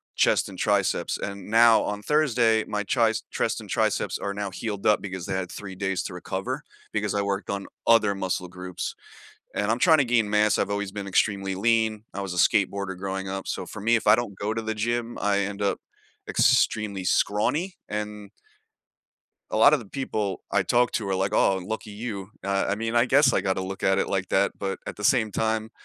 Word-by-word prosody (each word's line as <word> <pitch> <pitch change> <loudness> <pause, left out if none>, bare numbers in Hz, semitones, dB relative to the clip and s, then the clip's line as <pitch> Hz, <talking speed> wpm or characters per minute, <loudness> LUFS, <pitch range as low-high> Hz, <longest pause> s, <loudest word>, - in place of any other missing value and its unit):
chest - - +2
and - - -10
triceps, - - +1
and 100 -1 -6
now, 115 +1 +6
on 105 0 -3
Thursday, 120 -6 +2
my 105 0 -2
tries 110 +1 +1
chest - - -1
and - - -12
triceps - - 0
are 100 - -3
now 100 -1 -4
healed 100 +1 -5
up 105 - +4
because 95 -3 -6
they 95 - -3
had 95 -1 -2
3 95 -2 -8
days 95 -1 -1
to - - -6
recover - - -4 0.3
because 105 -1 -1
I 100 - +1
worked 100 0 -2
on 100 0 -3 0.2
other 110 -3 +5
muscle 95 -1 -2
groups. 90 0 -6 0.6
And, 105 +1 0
I'm 115 - 0
tryna 155 -5 +5
gain 115 -3 +2
mass, 105 -2 +3
I've - - 0
always 100 -1 -2
been 100 -1 -6
extremely 95 0 +1
lean, 110 +1 +1
I 100 - -4
was 95 -2 -4
a - - -5
skateboarder 100 0 +2
growing 95 0 -4
up, 95 0 -5
so 95 - -3
for 100 +4 -8
me, 115 +3 +3
if 110 - -1
I 105 - +8
don't 110 -5 -4
go 105 +2 -2
to 115 - -2
the 110 0 -3
gym, 120 +2 -2
I 100 -1 +1
end 100 0 -3
up 100 - 0 0.5
extremely 105 -3 +2
scrawny, 145 - +1
and 105 -1 -5 1.2
a - - -1
lot 115 +7 +7
of - - +2
the 115 - -10
people 105 -5 -3
I - - +2
talk 120 0 +2
to 105 -3 -2
are 95 - 0
like, 95 +2 0
“Oh, 95 -2 +3
lucky 110 +3 -5
you.” 105 -2 -6
I 100 0 0
I - - +2
mean, 115 +2 -3
I 120 - +5
guess 135 0 +5
I - - +2
got 95 - 0
to 95 - -3
look 95 +1 -6
at 95 0 +3
it - - 0
like 95 -1 -1
that, 100 +1 +2
but 95 -1 -3
at - - -6
the 105 - -7
same 110 -1 +3
time, 110 0 -1
105 Hz, 215 wpm, -25 LUFS, 95-110 Hz, 1.2 s, I